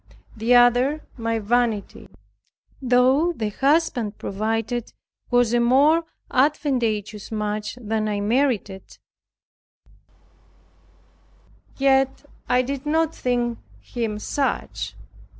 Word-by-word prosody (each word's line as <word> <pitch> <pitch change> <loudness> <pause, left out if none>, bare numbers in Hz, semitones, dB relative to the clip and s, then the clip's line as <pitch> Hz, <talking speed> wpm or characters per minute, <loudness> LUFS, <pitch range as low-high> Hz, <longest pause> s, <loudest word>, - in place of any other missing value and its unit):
The 230 +3 +2
other, 245 +5 +4
my 230 -1 -2
vanity. 225 -1 -1 0.7
Though 260 +6 +3
the 220 -8 -3
husband 270 -4 +1
provided 225 +3 -3 0.4
was 245 -2 +2
a 240 - +3
more 285 +7 +4 0.3
advantageous 240 -8 0
match 210 +1 -3
than 220 -2 -2
I 205 -1 -1
merited, 215 -3 -1 2.8
yet 270 0 +2 0.2
I 250 0 +3
did 275 +2 -5
not 320 +1 +1
think 240 -2 -1 0.2
him 225 -3 -4
such. 270 +6 -3
245 Hz, 90 wpm, -23 LUFS, 220-270 Hz, 2.8 s, other